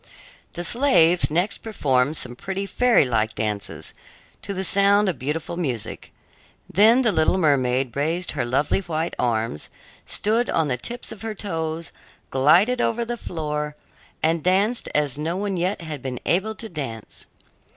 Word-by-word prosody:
The 175 - -5
slaves 180 -7 +4
next 175 +6 0
performed 145 - 0
some 120 - -4
pretty 190 +8 -4
fairy 240 - +3
like 110 -3 0
dances, 100 -7 -3 0.5
to 200 - -5
the 190 -1 -3
sound 200 +2 +4
of 175 -8 -1
beautiful 150 +5 -3
music. 130 -11 -4 0.6
Then 225 +7 +5
the 225 - +4
little 160 +1 +2
mermaid 130 -6 +1
raised 165 +5 -1
her 145 - -2
lovely 130 +9 +1
white 165 -3 -3
arms, 115 -9 -1 0.4
stood 225 +4 0
on 160 -3 +1
the 125 - +1
tips 240 - -5
of 200 - -9
her 225 -1 -4
toes, 165 -4 -4 0.4
glided 175 - +4
over 235 +1 0
the 240 +1 -3
floor, 150 -7 -4 0.5
and 165 +1 +2
danced 200 +6 +1
as 145 -2 +1
no 165 +4 -2
one 200 -1 -2
yet 180 +2 -1
had 155 -4 -6
been 125 -2 -5
able 210 +5 +1
to 225 - -7
dance. 135 - -7
165 Hz, 155 wpm, -23 LUFS, 135-200 Hz, 0.6 s, Then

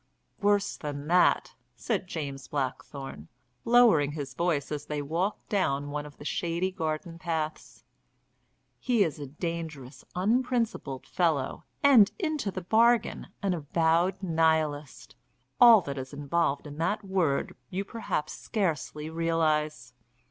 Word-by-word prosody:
"Worse 205 0 +2
than 145 -1 -5
that," 180 +1 +3 0.2
said 195 - -2
James 140 -6 -5
Blackthorne, 135 - -5 0.4
lowering 225 -12 +5
his 140 -3 -5
voice 155 -3 -1
as 150 -1 -4
they 150 -1 -2
walked 165 +8 -2
down 145 -8 0
one 150 0 -4
of 145 - -15
the 145 - -11
shady 170 +4 -1
garden 165 -1 -4
paths. 160 -2 -4 1.0
"He 240 -5 +3
is 160 -4 -3
a 145 - -6
dangerous, 155 -3 -6
unprincipled 230 - 0
fellow, 160 -7 0 0.2
and 250 -8 +7
into 310 - -1
the 185 -1 -5
bargain 230 +5 +3 0.2
an 195 -2 +1
avowed 165 +4 +1
Nihilist. 160 -4 0 0.4
All 235 -4 +9
that 140 -4 -5
is 130 +1 -7
involved 145 +1 0
in 145 +1 -9
that 205 +6 0
word 185 -8 0
you 195 +2 -3
perhaps 220 -8 -3
scarcely 155 - -2
realise." 155 -5 0
165 Hz, 125 wpm, -28 LUFS, 145-195 Hz, 1.0 s, All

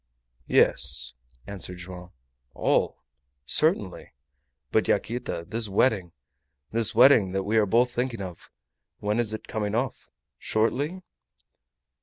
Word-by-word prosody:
"Yes," - - +3 0.3
answered 95 -2 -4
Joam. 90 0 -10 0.5
"All! - - 0 0.4
Certainly. - - 0 0.6
But, 110 - +2
Yaquita, 110 -5 -2
this 115 -1 -1
wedding 100 -4 +1 0.6
this 115 -3 +2
wedding 115 -6 +6
that 95 0 -1
we 105 +3 0
are 105 -2 +3
both 120 +5 +3
thinking 120 -2 -2
of 90 -3 -8 0.5
when 105 +2 -1
is 115 -3 +1
it 110 - -6
coming 105 -2 -3
off? 125 +3 -3 0.3
Shortly?" 145 +12 -1
110 Hz, 115 wpm, -26 LUFS, 95-120 Hz, 0.6 s, wedding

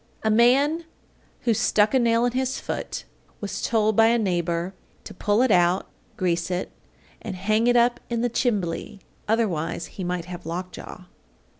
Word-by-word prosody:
A 220 - +2
man 275 +9 +4 0.6
who 235 - +2
"stuck 210 +1 +2
a 265 - +5
nail 230 0 +3
in 245 - +1
his 260 +1 -1
foot" - - -4 0.4
was 205 - -4
told 220 -2 +2
by 225 +1 +6
a 235 +1 +4
neighbor 175 -3 -1 0.3
to - - -9
pull 205 +5 +2
it 260 - +2
out, 180 0 +3 0.3
grease 170 -1 0
it, 180 0 -3 0.5
and 205 -4 -5
hang 215 +5 +1
it 245 - +4
up 240 0 +3
in 235 -1 -1
the 245 - +2
"chimbly," 210 -4 -1 0.3
otherwise 180 -8 0
he 190 - -8
might 180 -1 -2
have 180 -1 -8
lockjaw. 180 +2 -6
215 Hz, 165 wpm, -24 LUFS, 180-235 Hz, 0.6 s, by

